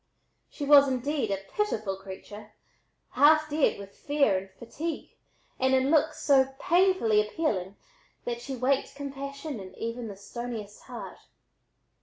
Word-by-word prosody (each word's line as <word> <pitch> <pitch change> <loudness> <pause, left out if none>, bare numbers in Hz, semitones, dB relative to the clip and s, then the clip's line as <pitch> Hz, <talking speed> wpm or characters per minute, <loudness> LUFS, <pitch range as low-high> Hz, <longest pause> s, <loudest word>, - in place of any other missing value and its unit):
She 290 - -5
was 285 -1 +8
indeed 260 -1 -1
a 195 0 -3
pitiful 215 - -1
creature, 200 +2 -10 0.6
half 310 +1 +5
dead 300 0 +2
with 200 0 -11
fear 285 -8 +2
and 195 +1 -12
fatigue, 295 - -6 0.5
and 260 0 +3
in 260 +2 +2
looks 310 0 +2
so 270 -2 +4
painfully 350 - +3
appealing 210 - -2 0.5
that 235 -1 -3
she 265 +2 -5
waked 260 +3 0
compassion 280 -1 -6
in 190 -1 -10
even 230 +1 -4
the 200 -2 -8
stoniest 220 0 -7
heart. - - -8
260 Hz, 135 wpm, -28 LUFS, 210-290 Hz, 0.6 s, was